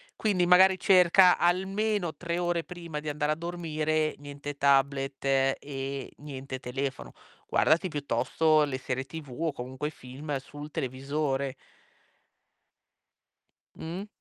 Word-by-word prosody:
Quindi 195 -5 +1
magari 185 +1 +6
cerca 180 -1 +6
almeno 190 +1 0
3 170 -1 -3
ore 175 -1 0
prima 170 -4 -7
di 150 0 -5
andare 150 0 0
a - - +1
dormire 155 -2 -1
niente 145 0 -7
tablet 140 0 +2
e 135 0 -1
niente 135 -2 -7
telefono. 135 +2 -4 0.3
Guardati 170 +5 +3
piuttosto 150 +2 +2
le 135 -3 -3
serie 130 0 -3
TV 145 0 -9
o 165 0 0
comunque 130 +2 -5
i - - -5
film 140 +2 -6
sul 145 +3 -9
televisore. 135 +1 -2 2.2
Mh. 175 +6 -6
150 Hz, 120 wpm, -28 LUFS, 135-170 Hz, 2.2 s, magari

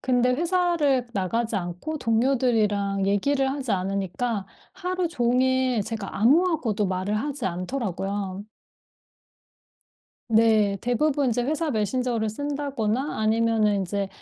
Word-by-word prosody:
근데 250 -1 +2
회사를 330 -5 +1
나가지 220 +3 -1
않고 180 - -4
동료들이랑 225 -5 +1
얘기를 265 +7 +1
하지 270 -4 -2
않으니까 195 +3 -2 0.3
하루 365 -1 -2
종일 255 -3 +1
제가 215 -2 -5
아무하고도 265 - +3
말을 190 +3 -1
하지 280 +2 -3
않더라고요. 195 0 -3 1.9
네. 220 -3 +4
대부분 270 +2 +1
이제 245 +1 0
회사 310 +4 -1
메신저를 230 0 0
쓴다거나 275 -1 -2
아니면은 220 -1 +2
인제 195 +1 -2
230 Hz, 280 characters per minute, -25 LUFS, 205-270 Hz, 1.9 s, 네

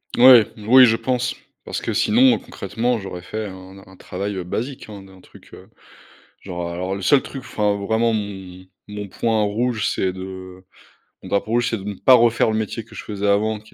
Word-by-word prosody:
Mouais. 125 -2 +8
Oui, 125 +5 +6
je 115 -2 +3
pense, 125 +2 -2 0.3
parce - - -5
que 115 - -3
sinon 235 - +4
concrètement, 120 +5 -3
j'aurais 95 -3 -7
fait 110 +5 -5
un 95 -1 -11
n 95 0 -14
un 95 - -17
travail 95 +1 -5
basique, 120 +7 -5
hein, 100 -2 -10
d'un 95 -1 -17
truc, - - -19
heu, - - -14 0.7
genre 90 -2 -6
alors 90 +2 -3
le 100 - -6
seul 135 +9 +4
truc, 135 - -8
enfin, 105 -5 -1
vraiment, 110 +3 0
mon 95 -3 -6 0.2
mon 105 -1 -7
point 110 +2 0
rouge, 110 +2 -1
c'est 95 - -1
de 95 0 -9 0.6
mon - - -11
drapeau 100 +2 -1
rouge, 120 0 +1
c'est 115 - -2
de 95 - -10
ne 105 +1 -4
pas 130 +6 +4
refaire 120 -2 +4
le 110 - -1
métier 110 +1 -4
que 115 - -17
je - - -7
faisais 105 -1 -4
avant 105 +2 +1
qui 110 +1 -20
105 Hz, 205 wpm, -21 LUFS, 95-115 Hz, 0.7 s, Mouais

